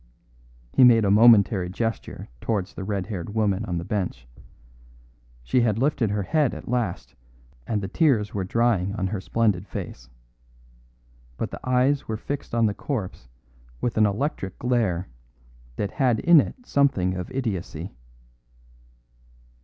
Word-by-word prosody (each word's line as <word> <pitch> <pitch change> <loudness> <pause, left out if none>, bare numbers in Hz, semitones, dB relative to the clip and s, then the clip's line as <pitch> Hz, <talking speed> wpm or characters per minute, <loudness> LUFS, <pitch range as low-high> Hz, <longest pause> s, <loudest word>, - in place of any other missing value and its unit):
He - - +5
made 115 -3 +6
a 100 - +3
momentary 105 -4 +5
gesture 115 +4 -4
towards 100 -5 -2
the 95 - -6
red 100 -1 -2
haired 100 -1 -6
woman 105 -2 +1
on 90 -4 -3
the 85 - -4
bench. 90 - -3 1.2
She 120 - +2
had 110 -3 +1
lifted 130 -3 +1
her 100 0 -1
head 150 - +1
at - - -10
last 120 -7 -2 0.5
and 105 -3 -1
the - - -2
tears 115 - +1
were 100 - -2
drying 100 -2 +1
on 95 -3 -2
her 95 0 -3
splendid 105 -2 0
face. - - -7 1.3
But - - -3
the - - -7
eyes 130 +2 +1
were 110 - -3
fixed 140 +1 -5
on 115 -1 +3
the 105 - +1
corpse 100 - -5 0.5
with 120 - -2
an 110 -1 +4
electric 100 - -3
glare 110 -8 0 0.7
that 100 +6 -3
had 125 -5 +1
in 170 -3 +7
it 245 - -8
something 130 - +2
of 90 -1 -5
idiocy. 95 -9 -4
105 Hz, 145 wpm, -24 LUFS, 95-120 Hz, 1.3 s, in